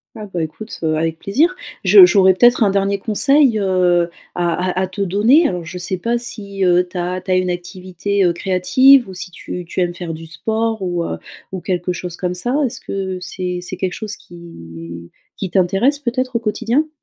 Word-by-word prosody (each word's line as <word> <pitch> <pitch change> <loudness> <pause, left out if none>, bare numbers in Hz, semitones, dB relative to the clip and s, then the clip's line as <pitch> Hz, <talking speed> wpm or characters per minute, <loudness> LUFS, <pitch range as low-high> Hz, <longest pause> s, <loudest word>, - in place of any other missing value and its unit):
Ah, 215 -2 -7
bah, 175 - -1
écoute, 160 +8 -6
heu, 160 -1 0
avec 160 0 -2
plaisir. 310 - +1 0.3
Je 395 - +8
j'aurais 195 - +6
peut-être 240 +5 +4
un 200 - +3
dernier 200 0 +1
conseil, 235 +4 +2
heu, 180 -3 +2 0.2
à 175 +1 -1
à 185 +1 -1
à 190 - 0
te 185 +2 -6
donner 215 - +4
alors 180 -7 -3
je 175 +3 -7
sais 180 +1 -3
pas 235 +5 0
si, 200 -5 -5
heu, 180 0 +3
tu 180 - -8
as 180 +1 -2
tu 185 - -13
as 185 - +3
une 185 0 +1
activité, 185 +2 -3
heu, 175 - +2
créative 195 +10 +4
ou 190 - -9
si 185 +1 -7
tu 180 0 -7
tu 175 - -3
aimes 175 -1 0
faire 170 -2 -6
du 165 +1 -10
sport 220 +7 -2
ou 175 -2 -1
heu - - -4 0.3
ou 185 -2 -5
quelque 180 0 -2
chose 175 0 -6
comme 180 -1 -2
ça. 240 +9 -2
Est-ce 240 - -5
que 190 -1 -4
c'est 180 0 -4
c'est 180 +1 -7
quelque 185 -1 -2
chose 215 -1 -5
qui 85 - -11 0.3
qui 190 -3 -4
t'intéresse, 195 +11 +2
peut-être, 255 -1 -2
au - - -2
quotidien? 235 +7 0
185 Hz, 210 wpm, -18 LUFS, 175-220 Hz, 0.3 s, Je